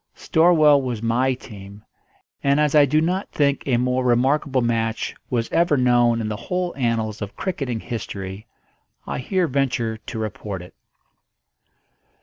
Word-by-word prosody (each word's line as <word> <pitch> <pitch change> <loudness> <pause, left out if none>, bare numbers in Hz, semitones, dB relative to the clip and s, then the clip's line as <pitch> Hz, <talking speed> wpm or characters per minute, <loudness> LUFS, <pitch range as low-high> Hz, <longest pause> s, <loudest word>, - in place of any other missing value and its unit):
Storwell 155 -4 +4
was 120 -4 -4
my 125 +3 +1
team; 100 -4 -12 0.6
and 140 +1 +3
as 150 -1 +2
I 150 -2 +7
do 155 +4 +2
not 180 +4 -1
think 140 -1 +1
a 125 -3 +2
more 125 +1 0
remarkable 130 +2 +2
match 115 -1 -1 0.2
was 115 -2 -1
ever 165 -3 +3
known 120 -2 +3
in 110 - -3
the 105 - -3
whole 180 -1 -1
annals 115 -4 -1
of 100 -1 -6
cricketing 135 - -3
history, 100 -4 -6 0.6
I - - -4
here 185 +7 0
venture 125 -5 -1
to 110 - -8
report 105 -3 -5
it. 90 - -14
125 Hz, 145 wpm, -22 LUFS, 115-145 Hz, 0.6 s, I